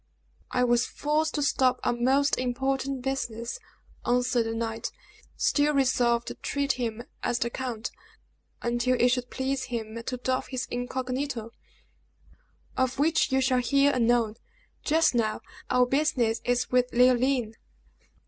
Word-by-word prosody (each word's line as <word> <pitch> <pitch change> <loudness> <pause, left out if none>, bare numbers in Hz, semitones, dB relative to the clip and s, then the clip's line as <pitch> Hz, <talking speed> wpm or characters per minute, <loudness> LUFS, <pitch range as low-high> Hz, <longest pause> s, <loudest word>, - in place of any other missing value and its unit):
"I 250 - +1
was 240 -1 +3
forced 310 +2 -1
to 295 - 0
stop 255 -3 +2
on 240 0 0
most 275 +3 +3
important 265 +1 -1
business," 235 -3 -3 0.4
answered 245 -1 +1
the 225 - -3
knight, 225 -1 -3 0.5
still 295 0 +2
resolved 240 -3 +2
to - - -5
treat 280 0 -1
him 235 -2 -3 0.2
as 240 - 0
the 235 0 -1
count, 245 -3 -4 0.7
until 240 +1 +1
it 245 - +5
should 245 -1 -1
please 265 0 -2
him 230 -2 -5
to 250 +2 -4
doff 255 +1 -1
his 255 -1 -3
incognito, 250 -1 -3 1.2
"of 260 0 0
which 305 0 +2
you 265 0 +3
shall 255 -1 +2
hear 275 +3 +3
anon. 235 -2 +2 0.5
Just 320 0 +3
now, 220 -3 0 0.3
our 250 0 +4
business 245 -4 +1
is 245 0 0
with 250 0 +2
Leoline." 250 -1 +3
250 Hz, 140 wpm, -27 LUFS, 235-270 Hz, 1.2 s, it